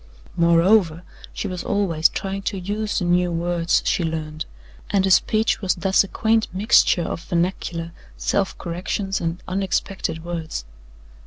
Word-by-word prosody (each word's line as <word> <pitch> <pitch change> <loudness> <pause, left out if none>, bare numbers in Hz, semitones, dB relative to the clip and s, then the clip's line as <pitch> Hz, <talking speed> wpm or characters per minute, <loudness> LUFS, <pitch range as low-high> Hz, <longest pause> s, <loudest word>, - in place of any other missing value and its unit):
Moreover, 170 0 +3 0.3
she - - -4
was 180 -2 -5
always 170 -6 +2
trying 195 0 -4
to 195 - -5
use 205 +3 -2
the 180 - 0
new 175 0 +2
words 170 0 +1
she 175 - +1
learned, 155 -1 -4 0.4
and 195 -1 +2
her 190 - +1
speech 220 +5 +3
was 190 -3 +1
thus 190 +3 +3
a - - -7
quaint 220 +2 +1
mixture 185 -2 +4
of 165 - -4
vernacular, 170 -1 -2 0.3
self 195 -1 0
corrections 190 +3 -3
and 165 +1 -3
unexpected 185 -3 -2
words. 165 - -4
180 Hz, 145 wpm, -22 LUFS, 170-195 Hz, 0.4 s, mixture